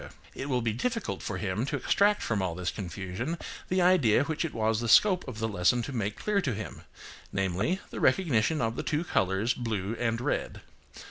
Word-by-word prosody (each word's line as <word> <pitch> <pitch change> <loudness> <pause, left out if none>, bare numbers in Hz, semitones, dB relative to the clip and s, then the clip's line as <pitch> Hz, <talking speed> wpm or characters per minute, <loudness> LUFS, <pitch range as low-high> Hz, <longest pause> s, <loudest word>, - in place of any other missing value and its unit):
It 140 - -5
will 125 -3 +1
be 115 -2 0
difficult 230 - -2
for 100 - -3
him 95 +3 -2
to 145 - -1
extract 200 +9 +2
from 110 -4 0
all 90 -3 -2
this 90 0 -2
confusion 100 - -4 0.3
the 185 0 +2
idea 145 - +4
which 160 +3 -2
it 165 - -2
was 110 0 0
the 115 - -2
scope 185 - +5
of 125 -4 -6
the 110 0 -1
lesson 105 +4 +2
to 140 - -5
make 105 -3 -2
clear 210 -1 +1
to 130 - -1
him; 110 - -7 0.5
namely, 95 - 0
the - - -5
recognition 155 - +2
of 115 0 0
the - - -2
two 150 +2 -1
colours, 95 - +1
blue 110 -3 -3
and 115 -1 0
red. 120 - -2
115 Hz, 200 wpm, -29 LUFS, 105-155 Hz, 0.5 s, scope